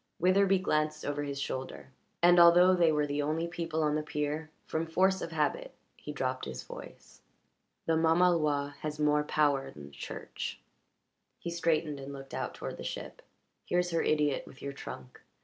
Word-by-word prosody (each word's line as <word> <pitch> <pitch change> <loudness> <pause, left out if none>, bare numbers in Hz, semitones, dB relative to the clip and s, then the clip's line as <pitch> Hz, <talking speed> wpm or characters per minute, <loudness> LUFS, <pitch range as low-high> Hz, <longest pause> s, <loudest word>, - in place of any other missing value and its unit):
Witherbee 190 +1 +4
glanced 155 -2 0
over 145 0 -2
his 140 -1 -4
shoulder, 130 0 -5 0.3
and, 175 0 +7
although 175 +2 +8
they 170 -3 +4
were 150 -1 +2
the 145 0 -1
only 155 +3 -1
people 165 -2 -2
on 150 -1 +2
the 155 - +1
pier, 150 +1 -3 0.2
from 160 +1 -2
force 190 +3 +2
of 165 - -4
habit - - -1 0.2
he - - -8
dropped - - -2
his - - -6
voice. - - -12 0.6
"The 165 - +2
mamaloi 160 -3 +3
has 150 -1 -4
more 150 0 +3
power 145 -2 +1
than 75 -1 -11
the 70 - -13
Church." 70 - -6 0.8
He 170 - -5
straightened 160 -3 0
and 135 +1 -7
looked 135 -1 -10
out - - -3
toward - - -6
the - - -7
ship. - - -6 0.4
"Here's 175 0 0
her 165 - +1
idiot 150 -2 +1
with 130 - -14
your 140 0 -4
trunk. 65 - -9
155 Hz, 175 wpm, -31 LUFS, 145-170 Hz, 0.8 s, although